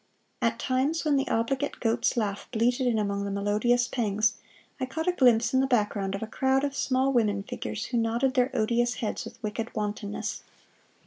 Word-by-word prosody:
At 230 -1 +1
times 270 +7 0
when 300 -2 +3
the 270 - +1
obligate 260 +5 -1
goat's 230 +1 +1
laugh 205 -3 -2
bleated 245 +2 +1
in 235 -2 +2
among 200 -1 -1
the 200 - -3
melodious 210 +5 +1
pangs, 215 -3 +1 0.5
I 260 - -2
caught 320 +6 -4
a - - +5
glimpse 245 -6 +3
in 260 - +4
the 265 - +2
background 205 -5 0
of 195 - -4
a - - -1
crowd 265 +4 +1
of 280 -1 -1
small 265 0 +1
women 210 -5 +2
figures 105 - -5
who 245 - -2
nodded 235 +3 +1
their 255 0 +3
odious 240 +2 +1
heads 220 -4 -3
with - - -10
wicked 220 +2 -4
wantonness. 210 -1 -3
235 Hz, 190 wpm, -27 LUFS, 210-260 Hz, 0.5 s, a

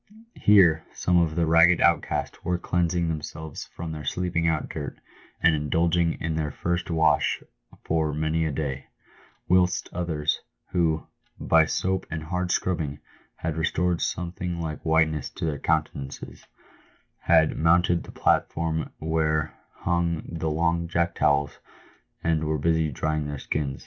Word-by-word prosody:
Here 85 -7 +5
some 90 -1 +2
of 80 -2 0
the 85 -1 +2
ragged 85 +2 +5
outcasts 85 -2 +1
were 90 0 0
cleansing 85 -1 0
themselves 80 -1 -5
from 85 -1 -7
their 75 -1 -6
sleeping 85 -1 -1
out 80 -2 0
dirt, 75 -3 -6 0.4
and 85 -1 +6
indulging 80 +3 +1
in 80 0 -3
their 80 -1 -1
first 85 +3 -2
wash 80 -1 +2 0.4
for 80 -1 0
many 80 +2 0
a 80 - -1
day; 70 -2 -4 0.6
whilst 90 0 +2
others, 80 -4 -1 0.3
who, 80 -3 +1 0.3
by - - +4
soap 95 0 -1
and 80 -1 -4
hard 90 +2 -2
scrub 90 0 0
bing, 75 -2 -4 0.4
had 80 -1 -4
restored 85 +2 0
something 90 0 -3
like 80 -2 -4
whiteness 80 -3 +2
to - - -5
their 75 -3 -2
countenances, 70 0 -3 0.7
had 80 -2 +3
mounted 85 +2 +3
the - - -11
platform 80 -1 0
where 80 -1 0 0.3
hung 85 -2 0
the 80 -1 -3
long 85 +2 0
jack 85 0 0
towels, 70 -2 +1 0.6
and 80 -1 +1
were 75 0 0
busy 80 +1 +1
drying 75 +2 -1
their 75 0 -4
skin. 70 0 -2
80 Hz, 145 wpm, -26 LUFS, 75-85 Hz, 0.7 s, and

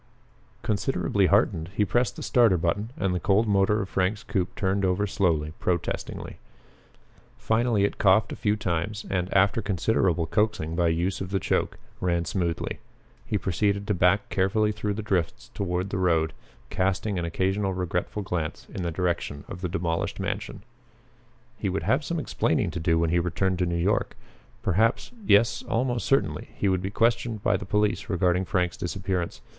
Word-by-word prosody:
Considerably 100 -3 +1
heartened, 95 -5 +2
he 105 - +2
pressed 120 +5 +1
the - - -7
starter 115 -7 +4
button 90 +7 -1
and 95 -2 0
the 90 - 0
cold 105 +5 +2
motor 100 +1 +3
of 95 - -8
Frank's 95 +4 0
coupe 95 -5 -2
turned 95 +1 0
over 95 +2 +2
slowly, 80 -7 0
protestingly. 85 -2 -3 1.0
Finally 110 -2 +1
it 100 - -1
coughed 100 +2 +4
a - - -4
few 105 -1 +1
times, 100 +1 -2
and, 90 -1 -1
after 100 +3 +3
considerable 95 -3 +1
coaxing 105 -3 0
by 85 0 +2
use 85 +4 0
of 95 - -4
the 95 0 0
choke, - - -1 0.2
ran 85 -2 0
smoothly. 85 -3 -2 0.5
He 105 - 0
proceeded 100 +2 0
to 105 - 0
back 90 +2 +3
carefully 105 +3 +2
through 105 -1 -2
the 110 - -4
drifts 95 -6 -2
toward 90 0 -2
the 95 - -1
road, 80 -3 +2 0.4
casting 95 +1 0
an 85 - -2
occasional 95 +3 0
regretful 90 +3 -2
glance 85 -5 -3
in - - -4
the 85 - -1
direction 85 -4 -2
of 90 - -8
the 90 - -2
demolished 85 -1 -2
mansion. - - -4 1.0
He - - -1
would 95 - -2
have 135 +4 +2
some 170 +3 -2
explaining 150 - 0
to - - -4
do 80 0 +2
when 80 -1 +1
he 85 - +3
returned 90 +2 0
to 90 - +1
New 85 - -1
York. 95 +5 0 0.5
Perhaps 110 - +1 0.2
yes, 105 +3 +4
almost 120 0 -1
certainly, 135 - +1
he 100 - 0
would 95 -1 +1
be 95 - -3
questioned 115 0 0
by 105 - +3
the 95 - -4
police 105 +3 +1
regarding 90 -1 +1
Frank's 90 -1 0
disappearance. 90 -1 -3
95 Hz, 170 wpm, -26 LUFS, 90-105 Hz, 1.0 s, starter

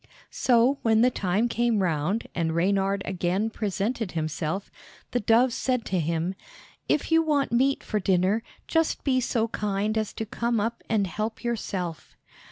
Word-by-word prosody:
So 250 +3 +3
when 220 -1 +3
the 250 +1 +5
time 200 +2 0
came 235 -3 +1
round 170 +5 0
and 165 -2 -1
Reynard 195 +2 +1
again 190 +4 -1
presented 210 0 -2
himself, 160 +3 -3 0.4
the 245 - +1
dove 235 +3 +3
said 250 -2 -1
to 185 - 0
him, 165 +3 -1 0.6
"If 300 - +1
you 325 0 +6
want 300 -3 +1
meat 265 +3 +2
for 210 - -1
dinner, 190 +3 +2 0.3
just 325 -1 +1
be 260 -2 +2
so 230 -2 0
kind 210 0 -1
as 215 - -2
to 225 - -4
come 235 +1 -1
up 230 +3 -2
and 215 -3 +2
help 215 +6 -4
yourself." 190 -8 -4
215 Hz, 160 wpm, -26 LUFS, 185-235 Hz, 0.6 s, you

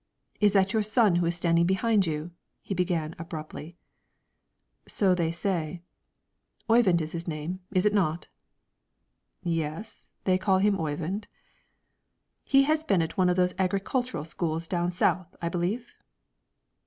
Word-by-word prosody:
"Is 205 -2 +4
that 195 0 +3
your 220 - +3
son 215 -3 +3
who 175 -1 +1
is 170 - 0
standing 170 0 +2
behind 195 0 +2
you?" 155 +2 -3 0.3
he - - -3
began, 170 -4 -1
abruptly. 165 0 -7 1.1
"So 195 -3 +2
they 170 -2 0
say." 170 -1 -2 0.8
"Oyvind 225 -7 +4
is 155 0 -4
his 170 +1 -5
name, 160 +3 -4
is 185 -1 +1
it 210 - +3
not?" 175 -5 0 1.2
"Yes; 165 +4 -4
they 185 -1 +2
call 190 0 +3
him 200 0 +2
Oyvind." 165 +6 -3 1.2
"He 275 0 +5
has 310 +2 +1
been 195 - +2
at 160 - -5
one 185 -3 +3
of 180 - +2
those 180 0 +2
agricultural 195 - -1
schools 165 -1 -2
down 175 0 0
south, 180 0 0
I 170 - -2
believe?" 185 +8 -2
180 Hz, 140 wpm, -27 LUFS, 165-200 Hz, 1.2 s, He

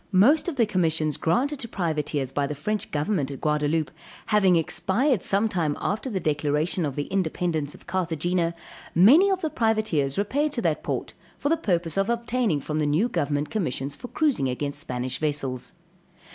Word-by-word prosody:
Most 245 - +5
of 345 - -2
the 235 -4 +3
commissions 160 -6 +1
granted 265 - 0
to 240 - -5
privateers 150 - -2
by 140 +1 0
the 150 - -4
French 210 +9 -2
government 150 -1 -1
at 140 - -6
Gaudaloupe, 150 +1 0 0.3
having 200 -4 +4
expired 205 - +1
sometime 190 -7 +1
after 215 +6 -2
the 200 -5 -2
declaration 150 +2 0
of 135 - -5
the 145 - -1
independence 165 -3 -1
of - - -16
Carthagena, 170 -1 -1 0.4
many 270 - +7
of 380 -1 0
the 315 -3 -1
privateers 215 - +1
repaired 285 +9 0
to 235 - -1
that 160 -3 +1
port, - - -3 0.2
for 285 - -1
the 330 - +4
purpose 175 - -1
of 195 +3 +1
obtaining 235 - 0
from 155 +2 -3
the 150 - +1
new 160 +11 +2
government 145 - -1
commissions 140 - -2
for 245 - -8
cruising 270 - +1
against 140 +3 -3
Spanish 125 -3 -3
vessels. 140 -5 -2
170 Hz, 175 wpm, -25 LUFS, 150-215 Hz, 0.4 s, many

